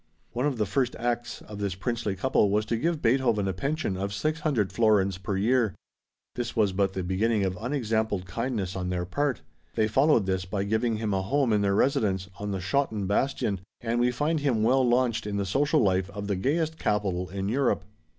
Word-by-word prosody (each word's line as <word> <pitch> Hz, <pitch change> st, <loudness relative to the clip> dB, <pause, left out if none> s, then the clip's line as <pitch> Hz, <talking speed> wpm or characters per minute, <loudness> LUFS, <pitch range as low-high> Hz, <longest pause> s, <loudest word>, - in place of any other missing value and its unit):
One 125 Hz, +4 st, 0 dB
of 135 Hz, -4 st, -2 dB
the 105 Hz, -, +1 dB
first 125 Hz, +4 st, 0 dB
acts 120 Hz, 0 st, -3 dB
of 105 Hz, -1 st, -9 dB
this 100 Hz, -2 st, -2 dB
princely 105 Hz, +1 st, -2 dB
couple 105 Hz, 0 st, +2 dB
was 105 Hz, +2 st, +1 dB
to 115 Hz, -, -1 dB
give 160 Hz, +6 st, -1 dB
Beethoven 115 Hz, -4 st, +2 dB
a 95 Hz, -, 0 dB
pension 135 Hz, -, -2 dB
of 100 Hz, +2 st, -3 dB
600 150 Hz, -5 st, 0 dB
florins 100 Hz, -5 st, +3 dB
per 95 Hz, +1 st, -2 dB
year. 115 Hz, 0 st, +2 dB, 0.6 s
This 120 Hz, -1 st, -4 dB
was 105 Hz, -4 st, +2 dB
but 95 Hz, 0 st, +1 dB
the 95 Hz, -, -3 dB
beginning 100 Hz, +4 st, +1 dB
of 95 Hz, -1 st, -1 dB
unexampled 110 Hz, -6 st, -1 dB
kindness 105 Hz, 0 st, -3 dB
on 90 Hz, -1 st, -3 dB
their 90 Hz, -1 st, -1 dB
part. 140 Hz, -, -1 dB, 0.3 s
They 110 Hz, -1 st, +2 dB
followed 130 Hz, 0 st, +3 dB
this 95 Hz, -1 st, 0 dB
by 95 Hz, +1 st, -2 dB
giving 110 Hz, +2 st, 0 dB
him 105 Hz, -2 st, -1 dB
a 95 Hz, -, +1 dB
home 125 Hz, +4 st, +1 dB
in 105 Hz, -, +3 dB
their 100 Hz, -1 st, +2 dB
residence 95 Hz, -6 st, +1 dB
on 105 Hz, 0 st, -3 dB
the 95 Hz, -1 st, -2 dB
Schotten 110 Hz, 0 st, 0 dB
bastion, 105 Hz, -1 st, 0 dB, 0.2 s
and 120 Hz, 0 st, -1 dB
we 120 Hz, +1 st, +3 dB
find 150 Hz, +6 st, 0 dB
him 130 Hz, -7 st, +1 dB
well 130 Hz, +4 st, +4 dB
launched 120 Hz, -3 st, +1 dB
in 100 Hz, -1 st, -2 dB
the 100 Hz, -, 0 dB
social 145 Hz, -, +2 dB
life 95 Hz, -2 st, +1 dB
of 100 Hz, 0 st, -6 dB
the 100 Hz, -1 st, -1 dB
gayest 155 Hz, -, 0 dB
capital 95 Hz, -4 st, 0 dB
in 95 Hz, 0 st, -3 dB
Europe. 110 Hz, -5 st, +1 dB
110 Hz, 205 wpm, -27 LUFS, 95-125 Hz, 0.6 s, well